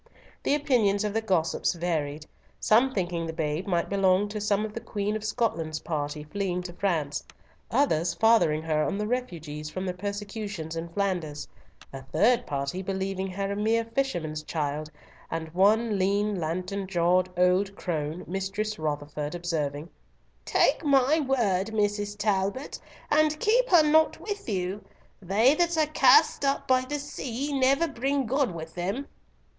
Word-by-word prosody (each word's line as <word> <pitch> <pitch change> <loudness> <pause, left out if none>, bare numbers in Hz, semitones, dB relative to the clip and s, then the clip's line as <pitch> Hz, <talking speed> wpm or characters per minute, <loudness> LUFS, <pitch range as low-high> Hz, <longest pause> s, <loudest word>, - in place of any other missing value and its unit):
The 285 - +2
opinions 230 -9 +2
of 210 -1 -2
the 225 - +1
gossips 185 -7 +1
varied, 155 -4 -2 0.3
some 240 +5 +4
thinking 175 -6 -2
the 160 - -4
babe 160 +2 -2
might 175 -3 +1
belong 195 0 +2
to 210 0 -4
some 210 0 +1
of 215 - -7
the 230 - -4
Queen 210 -2 -3
of 215 - -4
Scotland's 165 -8 -1
party 150 -1 -3
fleeing 180 +3 -3
to 175 -1 -7
France, 160 -6 -1 0.5
others 175 - +1
fathering 170 -7 +3
her 155 -1 +1
on 195 - -1
the 210 - -1
refugees 165 -11 -4
from 185 +4 -4
the 180 - -2
persecutions 200 -3 -5
in 165 +1 -4
Flanders, 175 -6 -2 0.5
a 135 - -6
third 235 - +2
party 140 +5 -2
believing 190 0 -2
her 195 +1 -3
a - - -2
mere 225 +2 +1
fisherman's 200 - -2
child, 150 -1 -3 0.4
and 160 -1 -5
one 210 +3 +3
lean, 200 +1 +1
lantern 185 +4 -3
jawed 180 0 +2
old 185 +2 +2
crone, 160 -2 -3
Mistress 195 +3 -3
Rotherford, 150 0 -3
observing, 155 -4 -2 0.6
"Take - - +2
my 280 +1 +4
word, 230 -9 +1
Mrs. 205 -1 -1
Talbot, 205 +5 -1 0.3
and 305 0 +3
keep - - +3
her 345 -4 +7
not 315 +1 +3
with 410 - -5
you. 190 0 -2 0.4
They 210 +8 +4
that 340 +1 +1
are 310 - +4
cast 310 +4 +5
up 275 0 0
by 255 -1 +3
the 295 - -1
sea 280 -1 -4
never 275 +4 +3
bring 275 0 -1
good 265 -1 +1
with 160 0 -7
them." 195 - -3
195 Hz, 155 wpm, -27 LUFS, 165-230 Hz, 0.6 s, her